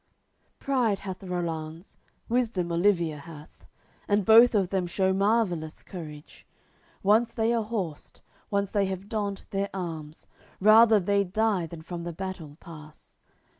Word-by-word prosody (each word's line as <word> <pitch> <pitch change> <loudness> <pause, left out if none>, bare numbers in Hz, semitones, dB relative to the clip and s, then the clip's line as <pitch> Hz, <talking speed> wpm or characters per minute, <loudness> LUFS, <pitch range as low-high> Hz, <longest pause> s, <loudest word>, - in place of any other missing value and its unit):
LXXXVII - - -44
Pride 245 -7 +1
hath 190 -2 -6
Rollanz, 170 -2 -5 0.3
wisdom 225 -8 0
Olivier 170 -3 +1
hath; 150 0 -13 0.4
And 205 -1 +1
both 230 +2 +7
of 195 -4 +2
them 190 -2 -1
shew 190 +2 +1
marvellous 190 -6 0
courage; 155 -5 -10 0.6
Once 220 +4 +3
they 225 +1 0
are 230 - +1
horsed, 200 -9 -5 0.3
once 200 -1 -1
they 200 -2 +1
have 190 +1 -5
donned 205 -3 -3
their 200 0 -1
arms, 160 -4 -6 0.3
Rather 215 +2 +7
they'd 200 0 0
die 210 -5 +1
than 160 0 -10
from 170 0 -6
the 170 0 -5
battle 170 -5 -7
pass. 155 -2 -14
190 Hz, 140 wpm, -27 LUFS, 170-210 Hz, 0.6 s, both